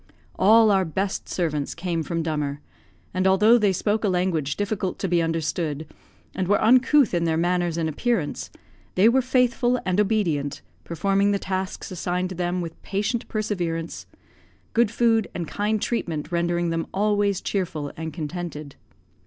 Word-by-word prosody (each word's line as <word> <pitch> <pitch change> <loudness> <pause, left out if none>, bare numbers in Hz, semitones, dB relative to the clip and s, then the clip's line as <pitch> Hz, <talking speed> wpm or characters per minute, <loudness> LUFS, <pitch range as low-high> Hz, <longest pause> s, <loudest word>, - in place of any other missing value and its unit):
All 220 +2 +5
our 195 -1 +3
best 190 +4 -3
servants 150 -5 -2
came 170 -1 -2
from 165 +2 -2
Dummer; 150 -3 -2 0.5
and 185 +1 +1
although 210 +5 +5
they 205 -3 +3
spoke 210 +4 0
a 205 - +2
language 180 -6 0
difficult 205 -2 -2
to 195 - -2
be 175 -1 +2
understood, 160 -2 -2 0.5
and 185 -1 -2
were 205 +2 +3
uncouth 255 +3 +4
in 170 -1 +1
their 160 -1 +1
manners 175 0 0
and 165 -1 0
appearance, 165 +1 -1 0.5
they 190 +4 +5
were 260 +3 +4
faithful 250 -1 +2
and 185 +2 +2
obedient, 170 -10 0 0.2
performing 195 +4 +1
the - - +2
tasks 190 -1 -4
assigned 180 0 -2
to 185 - -6
them 180 +1 -1
with 165 -1 -7
patient 210 +4 -2
perseverance; 175 -7 -3 0.7
good 235 -2 +3
food 225 -1 +2
and 170 -2 -3
kind 210 +4 -1
treatment 170 -10 -2
rendering 170 0 0
them 165 0 -2
always 205 -1 +1
cheerful 160 -7 -3
and 160 0 -5
contented. 155 -2 -6
185 Hz, 155 wpm, -24 LUFS, 165-210 Hz, 0.7 s, All